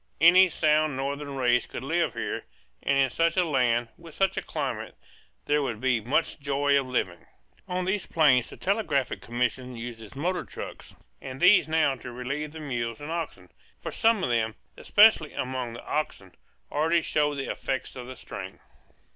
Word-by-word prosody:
Any 180 +4 +7
sound 155 -3 +2
northern 140 +1 -3
race 125 -2 +2
could - - -7
live 165 +5 0
here; - - -3 0.4
and 140 - +1
in 135 -2 +3
such 165 +4 +1
a 180 - +4
land, 120 -6 +1
with 165 -2 -13
such 195 0 +1
a - - -1
climate, - - -4 0.5
there 150 0 +2
would 120 -6 -3
be 125 -2 +1
much 140 +10 0
joy 140 0 +1
of 135 - -4
living. 90 -9 -2 0.4
On 180 -1 -2
these 190 +1 -1
plains 135 -7 +4
the - - -11
Telegraphic 190 - 0
Commission 125 +1 -2
uses 115 -2 -8
motor 180 +6 -1
trucks; - - -9 0.3
and 130 0 -7
these 185 +3 +6
now 155 -3 +2
to 125 - -9
relieve 140 +5 -4
the 160 - -9
mules 120 -6 -3
and 145 +2 -6
oxen; 165 -1 -5 0.3
for - - -5
some 225 -3 +2
of 125 - 0
them, 110 -2 0 0.2
especially 205 -7 +5
among 125 -2 -3
the 115 - -10
oxen, 100 - -3 0.4
already 165 +3 +2
showed 150 -1 +1
the 135 -1 -3
effects 130 -1 -4
of 125 -1 -7
the 130 - -8
strain. - - -8
140 Hz, 175 wpm, -27 LUFS, 125-165 Hz, 0.5 s, Any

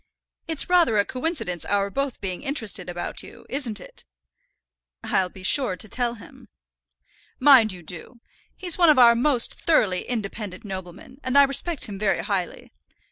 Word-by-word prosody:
It's 320 -3 +2
rather 345 - +3
a 200 - +3
coincidence 250 - -3
our 200 0 0
both 275 +2 -3
being 185 -2 -4
interested 225 - -2
about 175 0 -5
you, - - -14
isn't 245 -7 -3
it?" - - -13 1.0
"I'll 185 -1 +1
be 185 +1 -14
sure 245 -1 +2
to 215 - -5
tell 240 +2 -2
him." 220 - -15 0.9
"Mind 255 -6 +6
you 180 -2 -10
do. 180 +9 -9 0.4
He's 360 -2 -2
one 340 -2 +6
of 300 - +5
our 240 -2 +7
most 245 +1 +1
thoroughly 205 - +1
independent 210 -4 -5
noblemen, 190 +6 -9
and 260 +2 +1
I 280 - +9
respect 280 +3 +1
him 200 -2 -7
very 210 -2 0
highly. 190 -4 -4
225 Hz, 160 wpm, -23 LUFS, 195-275 Hz, 1.0 s, I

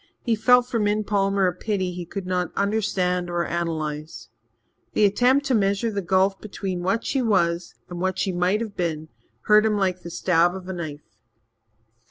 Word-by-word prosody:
He 235 - +1
felt 250 +3 +5
for 240 -2 -2
Min 210 0 +1
Palmer 195 -1 +1
a 180 - +1
pity 190 -1 -2
he 175 -1 -7
could 195 +1 -6
not 180 -2 -1
understand 185 -4 0
or 175 0 -1
analyze. 155 -4 -4 0.6
The 210 - +4
attempt 250 +7 +3
to 270 - +1
measure 200 +1 +1
the 200 -1 -2
gulf 190 +1 +1
between 195 -3 -4
what 195 +5 -1
she 270 - 0
was 170 -6 0
and 175 -1 -7
what 190 0 -1
she 195 - 0
might 180 +4 +1
have 220 -3 -5
been 160 -3 -3 0.3
hurt 210 0 +5
him 215 -1 +1
like 185 -2 0
the 170 - -8
stab 175 0 +2
of 185 -1 -8
a 190 - -4
knife. 155 -4 -8
190 Hz, 185 wpm, -24 LUFS, 175-210 Hz, 0.6 s, felt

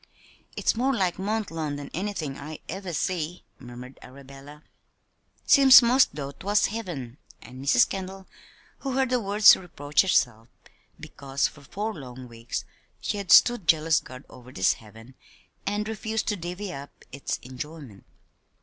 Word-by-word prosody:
"It's - - +1
more 260 +3 +1
like 185 -4 0
Mont 210 0 -2
Lawn 155 -3 -3
than 145 -1 -8
anythin' 175 -7 -3
I 150 +2 -8
ever 190 +1 -5
see," 170 +1 -3
murmured 125 +1 -11
Arabella. 140 +3 -13 0.8
"Seems 270 -3 +8
'most 250 +3 +5
as - - -31
though 140 -2 -5
'twas 205 +8 +1
heaven." 165 - -5 0.2
And 130 +2 -11
Mrs. 225 - +4
Kendall, 190 0 -6 0.5
who 270 -2 -4
heard 265 -1 0
the 250 - +2
words, 205 -1 +6
reproached 150 -5 0
herself 120 - +1 0.5
because 135 0 -2
for 145 - -15
four 210 +10 -4
long 130 -5 -10
weeks 115 0 -6 0.3
she - - -3
had 200 -2 -4
stood 240 -8 +6
jealous 160 0 +4
guard 130 +1 -12
over 125 0 -14
this 95 -6 +2
"heaven" 115 +3 -15 0.5
and 205 +1 -1
refused 220 0 -3
to 210 - 0
"divvy 180 +2 -6
up" 140 +1 -11
its 140 +1 -4
enjoyment. 130 -4 -9
160 Hz, 150 wpm, -26 LUFS, 135-205 Hz, 0.8 s, Seems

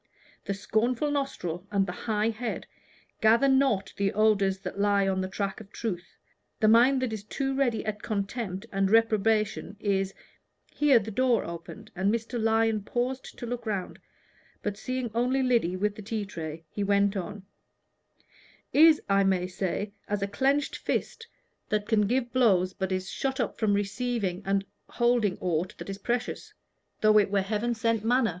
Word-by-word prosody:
The 200 - -2
scornful 230 +8 0
nostril 200 - -3
and 200 -2 +2
the 180 - -4
high 215 +3 -1
head 230 +1 -4 0.6
gather 230 +5 +5
not 265 -8 +2
the 200 -1 +1
odors 200 -3 +3
that 200 - -6
lie 200 -1 +3
on 190 -1 0
the 185 - -2
track 195 +1 -3
of 205 -1 -14
truth. 190 -6 -5 0.4
The 215 - +3
mind 250 +4 +5
that 240 -3 -1
is 210 -2 -5
too 270 +5 -2
ready 255 -5 0
at 210 -1 -3
contempt 200 -2 -3
and 195 0 +1
reprobation 215 -1 +2
is 195 -2 0 0.3
" - - -40
Here 290 -4 +5
the 220 0 -2
door 245 0 +2
opened, 170 +6 -9
and 195 +2 +1
Mr. 230 +1 -2
Lyon 225 -1 +2
paused 250 +5 -3
to - - -6
look 240 -1 -5
around, 195 -4 -3 0.6
but 205 -1 -2
seeing 255 +2 -3
only 250 +3 +1
Lyddy 235 -9 +2
with 205 +2 0
the 210 - -10
tea 210 0 -3
tray, 160 -3 -7
he 205 - -2
went 200 0 +2
on 200 +1 -5 1.3
"Is, 315 0 +6
I 195 -1 +3
may 190 -2 +2
say, 190 +2 -3
as 205 -1 -1
a - - 0
clenched 275 +7 +1
fist 460 - -3 0.4
that 210 -1 0
can 210 -3 +3
give 245 +1 0
blows, 190 -8 +3
but 190 -1 -3
is 185 0 -2
shut 265 +6 -2
up - - -2
from 210 -3 +2
receiving 205 -2 -1
and 195 0 +1 0.2
holding 235 -5 +2
aught 175 0 -1
that - - -6
is 195 - -7
precious 240 +3 -3 0.5
though 215 0 +6
it 205 - +2
were 200 -1 +1
heaven 220 +4 -1
sent 225 -1 0
manna." 245 +1 +3
215 Hz, 175 wpm, -28 LUFS, 195-240 Hz, 1.3 s, Is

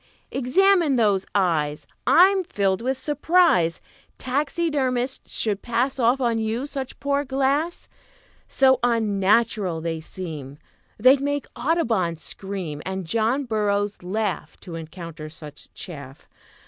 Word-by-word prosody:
"Examine 335 +3 +3
those 205 -5 +2
eyes. 155 -6 +1 0.2
I'm 380 +2 +6
filled 195 - 0
with 260 +2 -1
surprise 295 - +2 0.4
Taxidermists 270 -2 -1
should 210 -3 0
pass 250 +3 -1
Off 245 +2 +3
on 235 -3 +1
you 225 +4 -2
such 270 -2 -6
poor 280 0 0
glass; 275 +5 -1 0.6
So 260 -2 +4
unnatural 215 -4 +2
they 165 0 -3
seem 155 -5 -8 0.4
They'd 260 +5 +5
make 285 0 -1
Audubon 235 - 0
scream, 175 -2 -6
And 190 -1 -4
John 230 - 0
Burroughs 205 -2 -1
laugh 200 +2 -3
To 180 - -9
encounter 165 -1 -8
such 150 -2 -12
chaff. 140 -6 -9
225 Hz, 115 wpm, -24 LUFS, 180-270 Hz, 0.6 s, I'm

